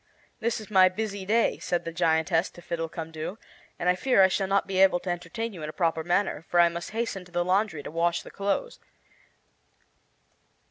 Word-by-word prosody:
"This 230 0 -1
is 215 0 -11
my 185 -2 +7
busy 200 0 -4
day," 230 +2 +2
said 175 - -2
the 165 - -3
giantess 165 +1 +2
to 175 - -13
Fiddlecumdoo, 165 +1 -5 0.4
"and 180 - -3
I 180 - +5
fear 195 +2 +3
I 190 - +6
shall 195 +1 0
not 195 +1 +2
be 190 -1 -2
able 190 -2 +5
to 180 - -3
entertain 180 +6 -4
you 175 - -9
in 150 - -4
a - - -7
proper 165 -2 0
manner, 175 -1 0
for 175 - +2
I 170 0 +7
must 170 0 -6
hasten 220 -4 -3
to 180 - -18
the 175 0 0
laundry 185 -4 +1
to - - -7
wash 170 +1 0
the - - -12
clothes. 205 - -2
180 Hz, 200 wpm, -27 LUFS, 170-200 Hz, 0.4 s, my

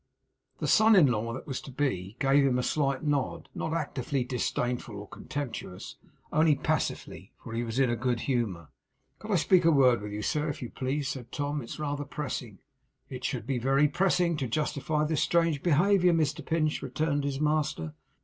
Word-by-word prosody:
The - - -3
son 220 0 +6
in 180 -6 +7
law 115 -3 0
that 130 - -7
was 135 -4 -4
to - - -10
be 120 -8 -2
gave 140 +1 +4
him 130 -2 +2
a 125 - 0
slight 140 -1 0
nod 145 -3 -1
not - - -3
actively 140 -4 -2
disdainful 125 -2 -2
or 100 0 -8
contemptuous, 130 -11 -6 0.4
only 155 -1 +4
passively; - - -3
for 115 - -8
he 115 +1 -1
was 115 0 -4
in 135 -3 +3
a - - +1
good 120 0 -1
humour. 110 - -2 0.5
'Could 210 - -10
I 205 - +2
speak 180 +1 +4
a 165 - +5
word 130 -7 +4
with 105 0 -6
you, 105 +1 -4
sir, 150 +5 0
if 145 - -4
you 120 - -6
please?' 135 +1 -2
said 125 -3 -6
Tom. 145 0 -2
'It's 115 - -8
rather 145 -1 -2
pressing.' 130 -7 -5 0.5
'It 130 -1 -7
should 125 -4 -2
be 130 -1 -1
very 135 +4 +3
pressing 175 +1 +1
to 135 -3 -2
justify 150 +3 -1
this 155 -1 0
strange 165 -4 +2
behaviour, 180 +2 +4
Mr 160 -3 0
Pinch,' 155 -2 0
returned 145 +2 -1
his 140 -1 -2
master. 150 - 0
140 Hz, 190 wpm, -29 LUFS, 125-155 Hz, 0.5 s, in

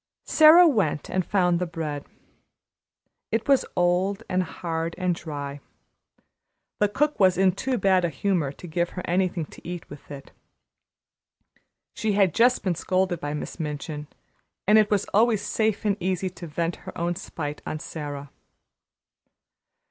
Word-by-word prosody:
Sara 330 +3 +8
went 200 - 0
and 185 - +1
found 180 -2 +2
the 180 - -1
bread. 155 -4 -5 1.2
It 225 0 -1
was 275 -2 +3
old 185 +4 +1
and 185 0 +1
hard 165 -1 -4
and 180 -1 +1
dry. 145 -4 -6 1.2
The 210 - +3
cook 295 +8 0
was 185 -3 +4
in 190 0 +4
too 255 +7 -2
bad 190 -4 +3
a 175 - +1
humor 170 -6 0
to 145 - -12
give 170 +1 -1
her 180 - -3
anything 180 -2 0
to - - -15
eat 175 0 -6
with 145 - -12
it. 140 -1 -9 1.6
She 220 -2 -1
had 195 -5 +3
just 245 +2 +3
been 185 - +1
scolded 185 +1 0
by 145 +1 -3
Miss 150 - -6
Minchin, 150 -1 -5 0.6
and 215 +2 +7
it 215 - +3
was 205 -2 +1
always 220 0 +3
safe 220 -1 0
and 205 -2 +2
easy 185 0 -1
to 170 -1 -9
vent 165 +2 -2
her - - -10
own 170 +1 0
spite 150 -3 -6
on 155 - -3
Sara. 145 -2 -7
180 Hz, 155 wpm, -25 LUFS, 160-200 Hz, 1.6 s, Sara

